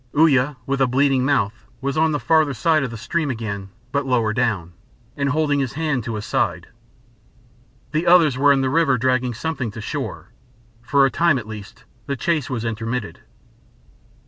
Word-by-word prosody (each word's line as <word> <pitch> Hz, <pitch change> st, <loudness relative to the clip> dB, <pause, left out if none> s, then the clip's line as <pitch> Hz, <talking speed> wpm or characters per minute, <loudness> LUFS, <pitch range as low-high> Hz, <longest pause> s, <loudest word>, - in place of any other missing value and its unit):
Uya, 145 Hz, -3 st, +4 dB
with 135 Hz, 0 st, -1 dB
a 135 Hz, -, +4 dB
bleeding 135 Hz, 0 st, +2 dB
mouth, 120 Hz, -5 st, 0 dB
was 135 Hz, +1 st, -2 dB
on 160 Hz, 0 st, +3 dB
the 145 Hz, -, -1 dB
farther 155 Hz, -3 st, +2 dB
side 155 Hz, +5 st, +2 dB
of 135 Hz, -, -2 dB
the 115 Hz, -, -7 dB
stream 155 Hz, +6 st, -2 dB
again, 100 Hz, -5 st, -4 dB, 0.2 s
but 140 Hz, +1 st, 0 dB
lower 120 Hz, -5 st, +1 dB
down, 105 Hz, -8 st, -1 dB, 0.4 s
and 140 Hz, -1 st, 0 dB
holding 145 Hz, -1 st, +1 dB
his 130 Hz, -5 st, -2 dB
hand 150 Hz, -5 st, -1 dB
to 115 Hz, 0 st, -4 dB
his 105 Hz, -, -5 dB
side. 85 Hz, +2 st, -1 dB, 1.2 s
The 155 Hz, +3 st, -1 dB
others 170 Hz, -6 st, +6 dB
were 140 Hz, +2 st, +4 dB
in 135 Hz, -1 st, +3 dB
the 130 Hz, -, +1 dB
river 150 Hz, -4 st, +3 dB
dragging 125 Hz, 0 st, 0 dB
something 145 Hz, -3 st, -3 dB
to 105 Hz, -, -9 dB
shore. 125 Hz, -1 st, -5 dB, 0.5 s
For 140 Hz, +3 st, +3 dB
a 135 Hz, -, +1 dB
time 170 Hz, -4 st, +3 dB
at 110 Hz, -4 st, -6 dB
least 105 Hz, -2 st, -10 dB, 0.2 s
the 140 Hz, -, -1 dB
chase 155 Hz, +2 st, -1 dB
was 120 Hz, -3 st, -3 dB
intermitted. 115 Hz, 0 st, -3 dB
135 Hz, 180 wpm, -21 LUFS, 115-145 Hz, 1.2 s, others